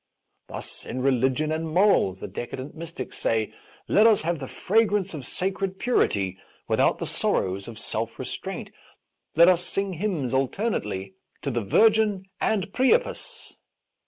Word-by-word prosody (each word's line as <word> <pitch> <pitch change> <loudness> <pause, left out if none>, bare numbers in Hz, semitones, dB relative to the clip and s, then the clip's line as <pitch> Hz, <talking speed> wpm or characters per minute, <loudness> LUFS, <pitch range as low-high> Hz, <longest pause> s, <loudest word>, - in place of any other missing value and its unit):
Thus, - - -9
in 130 - -4
religion 135 +3 +2
and 160 +1 -2
morals, 170 - +3
the - - -4
decadent 130 +3 -6
mystics 165 -5 -7
say: 110 -1 0 0.2
'' - - -28
Let 215 +2 +8
us 215 -6 +4
have 170 -1 -1
the 135 - -5
fragrance 205 - +1
of 145 -5 -7
sacred 190 0 -2
purity 100 - +1 0.3
without - - +3
the - - -4
sorrows 95 +1 -1
of 115 -2 -8
self - - -3
restraint; - - -5 0.6
let 170 +2 +7
us 180 -1 +4
sing 195 +1 -2
hymns 165 - -2
alternately 130 - -1 0.3
to 140 - -1
the 120 -1 -1
Virgin 210 - +3
and 200 -3 0
Priapus." 470 - 0
165 Hz, 145 wpm, -25 LUFS, 130-200 Hz, 0.6 s, Let